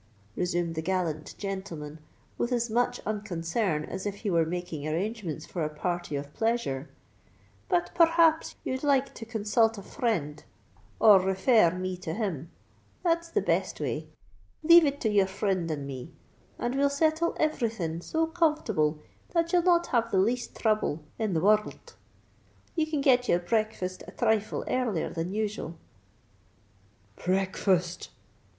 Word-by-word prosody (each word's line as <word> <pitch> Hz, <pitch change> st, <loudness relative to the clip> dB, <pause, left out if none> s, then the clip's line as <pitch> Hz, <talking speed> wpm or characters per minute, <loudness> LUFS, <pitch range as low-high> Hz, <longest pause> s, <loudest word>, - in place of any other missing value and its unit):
resumed 175 Hz, -2 st, -1 dB
the 160 Hz, -, -3 dB
gallant 165 Hz, -3 st, -2 dB
gentleman 175 Hz, -7 st, -5 dB, 0.4 s
with 240 Hz, -, -2 dB
as 240 Hz, -2 st, 0 dB
much 245 Hz, +2 st, +1 dB
unconcern 180 Hz, -5 st, -2 dB
as 190 Hz, -, -6 dB
if 200 Hz, -, -3 dB
he 200 Hz, 0 st, -3 dB
were 165 Hz, -2 st, +3 dB
making 170 Hz, -3 st, -4 dB
arrangements 185 Hz, 0 st, -3 dB
for 170 Hz, -, -4 dB
a 155 Hz, -, -1 dB
party 175 Hz, +1 st, -3 dB
of 145 Hz, +1 st, -5 dB
pleasure. 225 Hz, -, -1 dB, 0.8 s
"But 350 Hz, -2 st, +1 dB
per 335 Hz, -2 st, +6 dB
rhaps 330 Hz, -1 st, +3 dB
ye'd 260 Hz, 0 st, -2 dB
like 275 Hz, -2 st, +2 dB
to 225 Hz, -, -9 dB
consult 225 Hz, 0 st, +1 dB
a 200 Hz, -, -8 dB
frind—or 200 Hz, -, +1 dB
refer 190 Hz, +4 st, +4 dB
r 170 Hz, +2 st, +1 dB
me 185 Hz, 0 st, -2 dB
to 175 Hz, -3 st, -5 dB
him. 180 Hz, -, -3 dB, 0.5 s
That's 335 Hz, -1 st, +1 dB
the 265 Hz, -, 0 dB
best 190 Hz, 0 st, 0 dB
way! 150 Hz, +2 st, -3 dB, 0.6 s
Leave 335 Hz, +1 st, +8 dB
it 285 Hz, 0 st, -2 dB
to 220 Hz, -, +1 dB
your 200 Hz, -2 st, +4 dB
frind 190 Hz, -3 st, -1 dB
and 145 Hz, -3 st, -3 dB
me; 135 Hz, +4 st, -7 dB, 0.4 s
and 240 Hz, -, -2 dB
we'll 280 Hz, +1 st, +3 dB
settle 315 Hz, +3 st, +1 dB
everything 225 Hz, -, -1 dB
so 320 Hz, -, 0 dB
comfortable 300 Hz, -, +1 dB, 0.4 s
that 335 Hz, 0 st, +1 dB
you'll 355 Hz, -, +5 dB
not 345 Hz, -1 st, +3 dB
have 230 Hz, -2 st, +2 dB
the 195 Hz, -, +1 dB
least 235 Hz, +6 st, 0 dB
throuble 215 Hz, -8 st, 0 dB, 0.2 s
in 215 Hz, -4 st, 0 dB
the 160 Hz, -, +1 dB
wor 210 Hz, +3 st, +6 dB
rld. 210 Hz, -, -12 dB, 0.8 s
You 315 Hz, -2 st, +1 dB
can 305 Hz, -2 st, -1 dB
get 250 Hz, -3 st, +3 dB
your -, -, +5 dB
breakfast 185 Hz, 0 st, -2 dB
a -, -, -8 dB
thrifle 220 Hz, -3 st, 0 dB
earlier 235 Hz, -10 st, -1 dB
than 165 Hz, +2 st, -3 dB
usual——" 210 Hz, -5 st, -3 dB, 1.5 s
"Breakfast!" 185 Hz, -1 st, 0 dB
200 Hz, 150 wpm, -28 LUFS, 170-245 Hz, 1.5 s, Leave